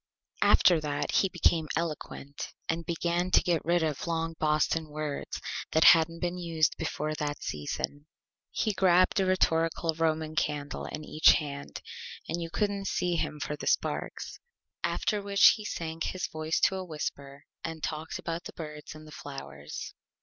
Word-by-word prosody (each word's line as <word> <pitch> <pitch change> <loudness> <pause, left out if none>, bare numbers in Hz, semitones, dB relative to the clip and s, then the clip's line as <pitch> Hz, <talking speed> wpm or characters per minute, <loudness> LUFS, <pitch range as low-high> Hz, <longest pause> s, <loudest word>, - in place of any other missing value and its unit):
After 175 -3 +6
that 145 -1 -2
he 195 - +3
became 165 -3 +2
Eloquent, 150 -3 -4
and 165 +1 -2
began 175 +1 0
to - - +5
get 170 -3 +1
rid 170 0 +2
of 155 0 -2
long 165 0 -1
Boston 155 +1 +1
Words 150 -1 -4 0.3
that 160 - +5
hadn't 165 0 +6
been 175 0 -1
used 165 -3 +1
before 155 -1 -2
that 145 -1 -3
Season. 145 - -4 0.4
He 215 - 0
grabbed 185 0 +4
a 190 - +2
rhetorical 165 -2 +2
Roman 160 -1 0
Candle 150 -3 -2
in 155 - -6
each 155 - +6
Hand 140 -3 -4 0.4
and 170 - -2
you 165 - -4
couldn't 200 +1 -1
see 175 -1 0
him 150 -2 -2
for 150 - -3
the - - -7
Sparks. - - -1 0.4
After 210 -1 0
which 200 0 +7
he 215 -2 -1
sank 165 -3 -3
his 185 -3 -2
Voice 155 0 -1
to 190 - +3
a 190 - -3
Whisper 140 -4 -5 0.2
and 160 -1 -5
talked 155 0 -3
about 165 +1 -4
the - - -7
Birds 150 -2 -8
and 155 0 -11
the 155 - -12
Flowers. 135 - -7
160 Hz, 165 wpm, -29 LUFS, 150-175 Hz, 0.4 s, which